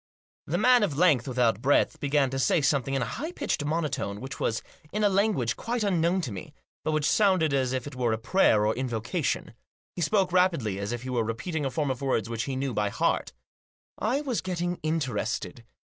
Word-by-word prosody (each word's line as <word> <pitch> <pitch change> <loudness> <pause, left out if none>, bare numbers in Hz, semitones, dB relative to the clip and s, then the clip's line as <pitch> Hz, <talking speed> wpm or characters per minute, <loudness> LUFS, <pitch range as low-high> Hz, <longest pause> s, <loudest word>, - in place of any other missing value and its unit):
The - - 0
man 250 -1 +5
of 160 -10 0
length 150 -8 +4
without 120 -4 +1
breadth 140 +3 +2
began 140 -2 +1
to 135 - -2
say 135 - +3
something 140 -2 +1
in 135 - +1
a 115 - -4
high 320 +3 -3
pitched 290 - -2
monotone, 145 -9 -2
which 130 +2 -7
was 115 - -1 0.3
in 210 +2 -1
a 205 - +5
language 195 - +1
quite 235 -1 -2
unknown 180 -1 +2
to 135 -9 -4
me, 95 -2 -8 0.3
but 155 - 0
which 155 -1 0
sounded 185 -8 +3
as 130 -2 +1
if 130 -2 -2
it 145 -2 -8
were 125 -2 0
a 110 - 0
prayer 110 - +3
or 110 - +2
invocation. 125 +4 -2 0.4
He 175 - -4
spoke 190 +2 +2
rapidly, 165 - +2
as 100 +2 -3
if 120 0 -4
he 130 - -5
were 120 -2 +1
repeating 140 +7 -3
a - - -1
form 145 0 -1
of 130 - -5
words 130 -5 0
which 115 0 -2
he 135 - -3
knew 135 -1 -2
by 105 -1 0
heart - - 0 0.7
I 255 +7 0
was 260 -6 -2
getting 175 -1 -2
interested. 135 -5 -2
140 Hz, 210 wpm, -27 LUFS, 120-180 Hz, 0.7 s, man